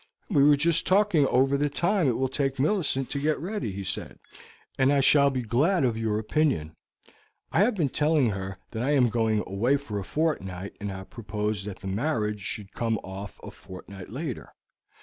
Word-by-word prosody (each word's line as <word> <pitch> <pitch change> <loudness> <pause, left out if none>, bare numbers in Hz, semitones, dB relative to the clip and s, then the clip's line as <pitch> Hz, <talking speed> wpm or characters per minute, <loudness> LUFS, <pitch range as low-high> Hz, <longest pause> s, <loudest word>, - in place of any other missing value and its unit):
"We 145 -6 +5
were 145 0 +6
just 165 +2 +2
talking 185 -7 +4
over 135 +2 +3
the 145 +1 +1
time 175 +3 +1
it 120 - +1
will 130 - +1
take 135 0 -1
Millicent 145 -4 0
to 140 - -1
get 150 +2 +1
ready," 190 - -3
he 100 +1 -5
said, 95 - -5 0.6
"and 135 +1 +3
I 140 - +3
shall 140 +1 +5
be 130 -2 -2
glad 140 - +2
of 120 -3 +2
your 110 -2 -1
opinion. 110 - 0 0.8
I - - +2
have 215 +4 +3
been 160 -8 +1
telling 150 -4 +2
her 95 -1 -5
that 110 - -4
I 140 +4 +1
am 125 -3 +4
going 110 -2 +1
away 120 +9 +1
for 110 -8 -5
a - - -4
fortnight, 100 - -2
and 100 - -3
have 95 -1 -8
proposed 105 -2 -3
that 105 -2 -7
the 95 - -6
marriage 105 -1 -1
should 100 0 -6
come 115 -1 0
off 95 +1 -8
a - - -8
fortnight 95 +1 -11
later. 130 +2 -6
130 Hz, 195 wpm, -27 LUFS, 105-150 Hz, 0.8 s, were